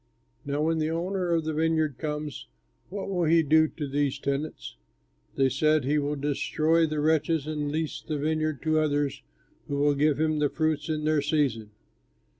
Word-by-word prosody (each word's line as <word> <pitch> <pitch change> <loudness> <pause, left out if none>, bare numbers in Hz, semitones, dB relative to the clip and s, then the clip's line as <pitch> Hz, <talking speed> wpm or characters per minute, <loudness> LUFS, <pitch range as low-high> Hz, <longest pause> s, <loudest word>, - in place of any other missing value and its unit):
Now, 145 +1 0
when 160 0 +1
the 155 0 0
owner 180 +2 -2
of 165 -1 +2
the 155 0 -2
vineyard 155 -3 0
comes, 150 -1 -4 0.4
what 195 +2 -5
will 180 -3 0
he 165 +1 +4
do 155 +1 +4
to 150 -1 -6
these 140 0 0
tenants?" 140 +2 -4 0.6
They 135 - +3
said, 155 +1 +2
"He 150 +2 +2
will 145 +1 -1
destroy 155 +3 +1
the 155 -1 -2
wretches 160 0 +1
and 150 -2 -3
lease 155 0 -3
the 155 -2 -4
vineyard 155 -1 -1
to 155 0 +2
others 145 -2 0 0.5
who 140 - -2
will 145 0 +3
give 145 +1 +2
him 155 -1 +1
the 145 -1 +2
fruits 155 -1 -1
in 155 -1 -1
their 155 -1 +2
season." 135 -8 0
155 Hz, 180 wpm, -27 LUFS, 145-160 Hz, 0.6 s, he